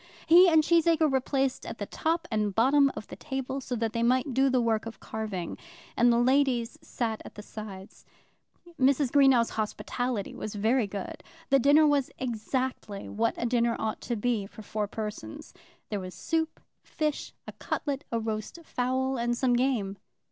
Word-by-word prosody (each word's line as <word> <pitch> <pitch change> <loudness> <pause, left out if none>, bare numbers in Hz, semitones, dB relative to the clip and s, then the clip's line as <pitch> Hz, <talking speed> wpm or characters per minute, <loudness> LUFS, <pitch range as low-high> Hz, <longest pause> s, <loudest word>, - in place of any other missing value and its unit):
He 355 +2 +8
and 320 -2 +5
Cheesacre 330 -2 +3
were 265 -1 +2
placed 270 0 -1
at - - -7
the - - -4
top 330 +1 -1
and 210 -3 0
bottom 275 +4 +4
of - - -6
the - - -9
table, 270 -1 -4
so 250 -1 -4
that 225 -1 -2
they 230 - -1
might 255 +3 +2
do 270 +2 +3
the 255 -1 +2
work 225 -1 0
of 230 - -9
carving; 210 -6 -5 0.4
and 240 +1 +5
the 235 - +3
ladies 250 -1 +2
sat 225 -3 -3
at - - -12
the 210 - -8
sides. 205 -3 -9 0.8
Mrs. 270 0 +3
Greenow's 270 -5 +5
hospitality 225 +1 -3
was 215 - -6
very 220 +3 +2
good. 200 -1 -6 0.3
The 275 - +6
dinner 290 +4 +6
was 285 -3 +2
exactly 240 -3 -3
what 225 +2 0
a - - -2
dinner 235 -1 +2
ought 220 - -3
to 240 - -2
be 220 -2 -1
for 215 - -12
four 210 0 -2
persons. 210 - -7 0.4
There 205 - -2
was 185 -1 -7
soup, 320 -1 -2 0.2
fish, 305 -2 -3 0.2
a - - -5
cutlet, 285 -1 -3
a 230 - 0
roast 220 +4 -4
fowl, 260 -1 -1
and 240 0 0
some 255 -1 +2
game. 240 -6 0
245 Hz, 175 wpm, -28 LUFS, 220-270 Hz, 0.8 s, He